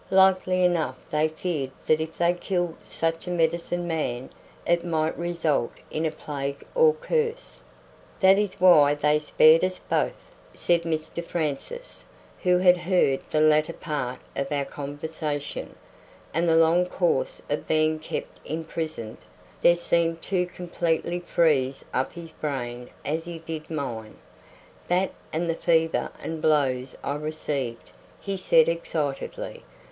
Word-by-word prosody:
Likely 185 -1 +4
enough 175 -3 +1
they 150 +1 +3
feared 155 -3 -3 0.2
that 155 0 +3
if 160 0 -5
they 170 0 +3
killed 175 -1 -1
such 165 +1 -2
a - - -2
medicine 170 +1 0
man 135 -6 -2 0.3
it 170 0 +2
might 160 -2 0
result 170 -7 0 0.2
in 160 +1 0
a - - -2
plague 140 -2 -5
or 475 -2 +5
curse." 475 0 -2 0.6
"That 190 +1 +6
is 205 -2 -2
why 150 -6 +7
they 150 +1 +2
spared 155 +2 +5
us 185 0 0
both," - - -2 0.2
said 170 -1 +2
Mr 160 +1 -3
Francis, 170 - -4 0.4
who 180 -1 +4
had 180 0 +6
heard 175 -6 +2
the 155 - +2
latter 155 +1 +4
part 130 -7 -3 0.2
of 140 +1 -2
our 140 -1 0
conversation; 145 +1 -5 0.6
"and 165 +2 +2
the 165 - +4
long 165 +2 +4
course - - 0
of - - -2
being 155 0 +2
kept 155 - -6
imprisoned 160 -7 -4 0.4
there 175 - +6
seemed 170 -1 0
to 180 -2 0
completely 175 -1 -2
freeze 145 -6 +1
up 130 - 0
his 170 -1 -9
brain 125 -4 -4 0.2
as 160 +3 -2
it 165 -1 -8
did 160 -1 -6
mine. 120 -9 -4 0.7
That 180 +2 +2 0.2
and 165 +2 -1
the 165 - +1
fever 165 0 +1
and 160 -1 -5
blows 135 -5 +1
I 140 - -1
received," 150 -5 -4 0.3
he 195 -1 -3
said 480 - +4
excitedly. - - -3
165 Hz, 140 wpm, -26 LUFS, 150-180 Hz, 0.7 s, why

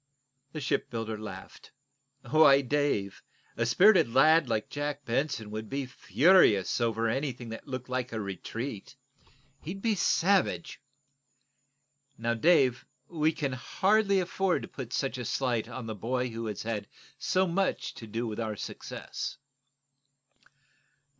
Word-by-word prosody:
The 155 - -5
shipbuilder 115 -4 -2
laughed. 100 -3 -10 0.5
"Why, 140 -1 +6
Dave, 135 -8 -1 0.3
a 115 - 0
spirited 180 - +5
lad 155 +3 +5
like 110 -2 -1
Jack 145 -1 -4
Benson 115 -3 -1
would 110 0 -6
be 140 0 -2
furious 130 - +3
over 115 -1 +1
anything 125 -1 -3
that 115 - -8
looked 130 -2 -5
like 125 -1 -3
a 110 - -3
retreat. 110 +5 -6 0.7
He'd 180 +6 -6
be 225 -2 +2
savage. 190 -2 +1 1.4
Now, 115 +1 0
Dave, 130 -1 +3 0.3
we 160 -2 +1
can 140 -4 -3
hardly 195 - +2
afford 185 0 0
to - - -6
put 125 -4 -8
such 135 -1 -2
a - - -3
slight 120 -1 -1
on 125 -1 -6
the 110 - -4
boy 125 +4 -2
who 115 0 -5
has 105 -2 -4
had 105 -3 -3 0.3
so 185 +5 +2
much 190 +2 -1
to 115 - -10
do 115 +3 -3
with 110 -1 -5
our 110 -2 -2
success." - - -6
125 Hz, 135 wpm, -29 LUFS, 115-155 Hz, 1.4 s, Why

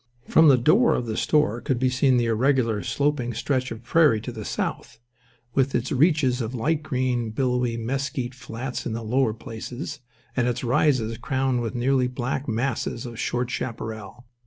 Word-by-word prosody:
From 160 0 +6
the 135 -3 +7
door 185 - +4
of 120 - -2
the 110 -1 -3
store 135 -6 +1
could 130 +2 0
be 130 +1 +1
seen 130 0 +3
the 120 - +2
irregular, 115 -1 +2
sloping 130 +2 -1
stretch 130 +1 -1
of 115 +1 -8
prairie 145 -3 +4
to 125 - -5
the 110 -3 -7
south, - - -4 0.6
with 135 0 +1
its - - -1
reaches 140 -3 +3
of 115 +2 -4
light 150 +6 0
green, 125 -5 -1
billowy 125 0 0
mesquite 130 +1 -3
flats 125 +1 -5
in 115 - -3
the 115 +1 -4
lower 115 0 +1
places, 120 +6 -7 0.4
and 125 -2 +1
its 125 +1 -2
rises 120 -3 +1
crowned 130 -1 0
with 115 +1 -3
nearly 125 +1 +2
black 125 +2 -3
masses 120 0 -2
of 120 -2 -8
short 125 0 -1
chaparral. 115 0 -5
125 Hz, 175 wpm, -24 LUFS, 115-135 Hz, 0.6 s, the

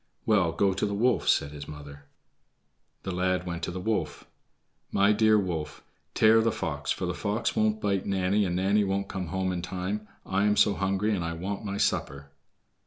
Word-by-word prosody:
"Well, 100 -6 +3
go 95 +3 +1
to 95 - -1
the 100 - -2
wolf," 120 +3 +2
said 70 - +2
his 70 -1 -8
mother. 70 -1 -10 1.0
The 95 - -3
lad 90 0 0
went 85 -1 -4
to 85 - -3
the 95 - -5
wolf. 90 -8 -2 0.7
"My 100 +1 +4
dear 110 0 +4
wolf, 85 -6 -3 0.3
tear 110 +1 +6
the 115 0 +2
fox, 75 -6 -4
for - - 0
the - - -2
fox 105 +3 -2
won't 110 0 +1
bite 100 -3 -1
Nanny, 100 +1 +1
and 90 -3 -1
Nanny 100 +3 +2
won't 100 0 -2
come 95 -2 -4
home 95 +2 -1
in 90 -1 -3
time. 95 +4 -4 0.2
I 100 +2 +1
am 105 0 +2
so 105 - +5
hungry, 100 +2 0
and 90 - -2
I 85 0 -3
want 95 +5 -4
my 100 -1 -3
supper." 70 -6 -1
95 Hz, 195 wpm, -27 LUFS, 85-105 Hz, 1.0 s, tear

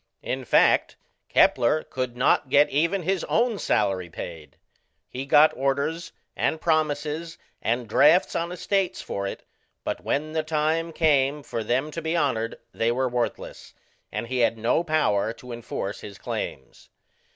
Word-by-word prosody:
In 130 0 -3
fact, - - +3 0.3
Kepler 150 +6 +3
could 130 -2 -4
not 130 +1 +2
get 145 +2 +4
even 170 +6 +1
his 190 +1 0
own 230 -2 +1
salary 95 -4 0
paid: 80 -1 -9 0.5
he 130 +2 -6
got 150 +2 +6
orders, 140 +5 -1 0.2
and 160 - 0
promises, 155 0 -1 0.2
and 120 +1 -1
drafts 150 - +4
on 170 +1 -1
estates 190 +1 -1
for 100 0 -3
it; - - -7 0.4
but - - -4
when 155 +2 -1
the 160 0 0
time 155 +2 0
came 145 -3 +2
for 115 -4 -4
them 130 +7 0
to 165 - -5
be 160 +2 -1
honoured 115 -8 0 0.2
they 115 +1 +1
were 130 +2 0
worthless, 120 -2 -4 0.4
and - - -3
he 125 +2 -3
had 115 -1 +2
no 115 +9 +1
power 115 - +1
to 125 +1 -12
enforce 115 -4 -5
his 100 -1 -9
claims. - - -6
140 Hz, 150 wpm, -25 LUFS, 120-160 Hz, 0.5 s, got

